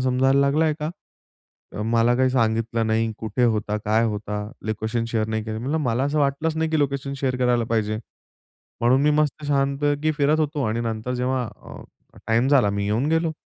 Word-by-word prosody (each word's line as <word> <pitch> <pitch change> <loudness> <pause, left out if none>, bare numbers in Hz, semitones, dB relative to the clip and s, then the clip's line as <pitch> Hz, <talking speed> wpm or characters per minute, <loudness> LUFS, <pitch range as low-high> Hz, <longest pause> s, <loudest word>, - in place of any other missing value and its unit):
समजायला 130 +2 +3
लागलाय 150 +3 +2
का? 150 +1 -2 0.9
अ, 105 - -2
मला 115 +2 +2
काही 130 0 +3
सांगितलं 115 -2 0
नाही 110 0 +1
कुठे 110 +3 -1
होता, 105 -2 0
काय 110 +2 +2
होता? 105 -1 -3 0.2
लोकेशन 110 +2 -2
शेअर 110 -1 0
नाही 110 -1 -2
केले." 110 0 -4
म्हंटलं, 140 +7 -1
"मला 120 +1 0
असं 145 +2 0
वाटलंच 150 +3 0
नाही 160 0 0
की 160 - +1
लोकेशन 140 -1 -1
शेअर 130 -2 0
करायला 125 -2 +2
पाहिजे. 110 -1 0 0.8
म्हणून 125 +3 +3
मी 150 - +4
मस्त 150 0 0
छानपैकी 145 +2 +1
फिरत 150 +1 +2
होतो 150 -2 -1
आणि 110 +1 -1
नंतर 115 +1 -3
जेव्हा 125 +1 0 0.2
अ, - - -10 0.4
टाईम 115 +4 +2
झाला 130 -8 +4
मी 100 0 -2
येऊन 110 +7 0
गेलो." 165 0 +1
125 Hz, 185 wpm, -23 LUFS, 110-140 Hz, 0.9 s, मी